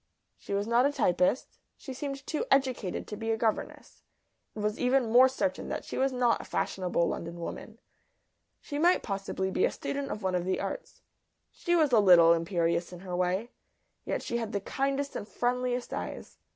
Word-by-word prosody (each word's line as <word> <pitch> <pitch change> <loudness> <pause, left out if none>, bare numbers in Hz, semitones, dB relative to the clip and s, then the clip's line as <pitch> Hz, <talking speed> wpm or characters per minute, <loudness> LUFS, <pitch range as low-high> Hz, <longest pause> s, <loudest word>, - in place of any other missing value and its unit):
She 200 - -4
was 200 +1 0
not 235 +4 +4
a - - -1
typist. 230 -4 +1 0.2
She 265 - -8
seemed 275 +1 -5
too 310 - -2
educated 255 -8 +1
to 210 - -6
be 225 +2 -4
a 225 - +1
governess. 220 -1 -3 0.5
It - - -6
was 210 +1 -1
even 250 -2 +2
more 255 +2 +7
certain 275 +2 -2
that - - -4
she - - -6
was 270 +1 +2
not 245 -2 +2
a - - -9
fashionable 180 -2 -1
London 170 +1 -5
woman. 220 +6 -7 0.8
She 290 -1 -5
might 350 +3 +4
possibly 195 -1 -3
be 375 - +1
a 485 - +4
student 280 0 -4
of 210 - -5
one 190 -1 0
of 180 -1 0
the 185 - 0
arts. - - -6 0.5
She 345 -1 0
was 310 -5 +3
a 230 - +6
little 175 -4 +7
imperious 170 0 0
in 180 -1 -10
her 185 -2 -5
way, 185 +6 -1 0.5
yet - - -3
she 235 - -2
had 225 -2 -4
the 200 - 0
kindest 275 +5 -2
and 205 - -5
friendliest 250 +1 -1
eyes. - - -6
230 Hz, 190 wpm, -29 LUFS, 185-265 Hz, 0.8 s, more